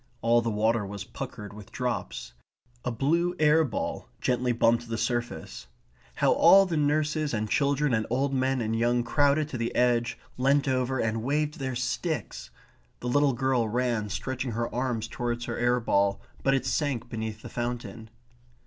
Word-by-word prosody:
All 120 +1 +4
the 115 - -1
water 110 +1 +1
was 100 0 -6
puckered 105 -2 -7
with 105 -1 -12
drops. 125 - -3 0.5
A - - -1
blue 165 +9 +1
air 155 0 +5
ball 125 -8 -4
gently 125 0 +1
bumped 115 0 +2
the 115 - -2
surface. 120 - -3 0.5
How - - +3
all 195 0 +7
the 175 -3 -2
nurses 150 -1 +1
and 110 0 -1
children 140 +3 +1
and 110 -1 0
old 135 +3 0
men 130 -1 +1
and 110 0 -1
young 120 +1 +2
crowded 145 +3 +2
to 130 - -5
the 115 0 -2
edge, 120 -1 +2 0.2
leant 140 +2 +2
over 130 0 0
and 110 -2 0
waved 150 +4 -1
their 130 -2 -3
sticks! 125 - -3 0.5
The 125 - -3
little 145 +1 +3
girl 125 -2 +1
ran 120 -2 0
stretching 130 +3 -3
her 115 +1 -2
arms 120 -3 -1
towards 120 0 -3
her - - -4
air 120 0 +2
ball, 100 -3 +1 0.2
but 135 0 +3
it 135 - -1
sank 135 -3 -1
beneath 110 -2 -5
the - - -6
fountain. 120 -2 -5
125 Hz, 170 wpm, -27 LUFS, 115-135 Hz, 0.5 s, all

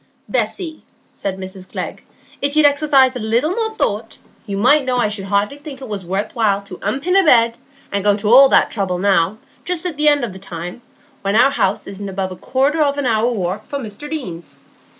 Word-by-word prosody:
"Bessy," 330 -5 -2 0.3
said 190 -1 -4
Mrs 190 0 -9
Glegg, - - -5 0.4
"if 285 +1 0
you'd 310 -1 +6
exercise 280 -3 +4
a - - -3
little 235 +8 +1
more 445 +2 -2
thought, 220 - -2 0.3
you 200 -1 -3
might 265 +8 +4
know 255 -1 -1
I 240 -4 +2
should 205 -2 -5
hardly 200 +7 0
think 290 -2 -9
it 265 - -8
was 205 -3 -5
worth 190 +4 -3
while 210 -4 +2
to 185 -2 -10
unpin 275 - -1
a 390 - +6
bed, 235 -6 +5 0.4
and 200 -1 -1
go 205 0 +3
to 210 0 -3
all 270 +1 +9
that - - +4
trouble 190 -4 -1
now, 190 +1 +2 0.3
just 360 -1 -3
at 340 -5 -3
the 300 0 +2
end 290 -4 +2
o' - - -6
the 190 0 -10
time, 180 +2 -7 0.4
when 200 +1 -1
our 255 +5 +5
house 195 -7 0
isn't 200 0 -7
above 190 0 -3
a - - -6
quarter 275 - 0
of 285 -1 +2
an 285 - -1
hour's 230 0 +1
walk 190 +3 -3
from 280 -2 -4
Mr 220 +7 -8
Deane's. 180 - -6
225 Hz, 215 wpm, -19 LUFS, 195-285 Hz, 0.4 s, all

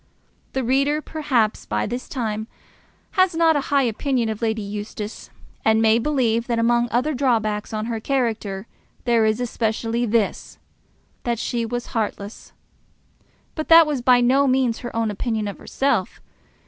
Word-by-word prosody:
The 265 - -1
reader, 275 +5 +2
perhaps, 275 -9 -1
by 105 0 -1
this 245 +3 -5
time, 220 -4 -3 0.6
has 370 -3 +2
not 325 -1 +4
a - - +2
high 280 -1 +3
opinion 240 0 0
of 220 0 -4
Lady 220 -1 -1
Eustace, 210 +1 -6 0.3
and 220 0 +4
may 225 0 +4
believe 235 -4 0
that 235 -2 0
among 235 +1 +2
other 255 +7 0
drawbacks 225 -6 0
on 215 0 -3
her 230 -1 -3
character 220 -6 -2 0.4
there 235 -2 +3
is 215 +1 +1
especially 230 0 -1
this, 220 -1 -1 0.6
that 235 -1 -1
she 235 0 -2
was 240 +1 -3
heartless. 210 -2 -4 1.0
But 310 - -4
that 330 0 +8
was 295 -4 -2
by 245 0 +5
no 270 +3 +3
means 255 -3 +1
her 240 - -7
own 225 -2 0
opinion 220 0 -2
of 200 - -6
herself. 275 +1 -1
235 Hz, 155 wpm, -22 LUFS, 220-265 Hz, 1.0 s, that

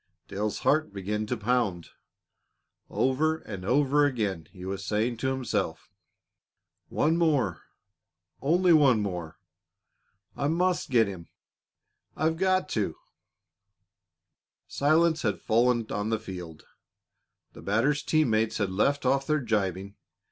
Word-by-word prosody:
Dale's 105 +1 -3
heart 155 -5 +2
began 105 +2 -3
to 125 - -2
pound. 110 -6 -1 1.0
Over 155 +5 +1
and 100 -11 -8
over 140 +6 +3
again 105 - -1
he 90 -1 -10
was 95 0 -4
saying 110 +5 -1
to 130 - -2
himself: 105 -12 -2 1.0
"One 160 +3 +1
more! 145 - +1 0.8
Only 175 +4 +3
one 140 -7 +5
more! 90 -5 -5 1.0
I 140 - -1
must 175 +3 0
get 115 -4 +4
him 90 -4 -8 0.9
I've 160 +1 0
got 185 +1 +1
to!" 100 -7 -1 1.7
Silence 160 +3 +2
had 100 -3 -1
fallen 120 +1 +2
on 105 +1 -2
the 115 - +1
field. 90 -7 -9 0.9
The - - -12
batter's 130 +8 +1
team 155 -6 +1
mates 110 0 +1
had 100 -3 -1
left 140 +9 +1
off 135 +1 +1
their 155 0 +2
gibing. 100 - -2
115 Hz, 120 wpm, -27 LUFS, 100-145 Hz, 1.7 s, one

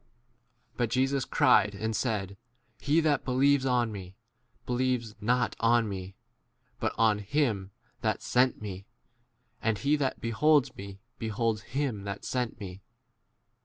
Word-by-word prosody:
b 125 - -39 0.7
But 120 -2 +1
Jesus 135 +2 +1
cried 125 -8 +4
and 110 +2 -2
said, 100 -6 -1 0.4
He 150 +3 +2
that 155 -2 +2
believes 135 +1 +3
on 120 -3 +2
me, 95 -2 -8 0.5
believes 125 -3 0
not 120 +2 +1
on 115 0 +3
me, 95 -1 -6 0.6
but - - 0
on 110 -2 +4
45 105 +3 -12
him 110 -10 +1 0.3
that - - -1
sent 125 +1 +2
me; 95 -1 -7 0.7
and 110 -2 +1
he 140 +6 +2
that 135 -3 -1
beholds 145 +5 +2
me 100 0 -8 0.2
beholds 110 -1 -1
him 125 -3 -3
that 100 +1 -5
sent 125 -3 -1
48 - - -26
me. 90 +2 -11
115 Hz, 145 wpm, -29 LUFS, 105-130 Hz, 0.7 s, cried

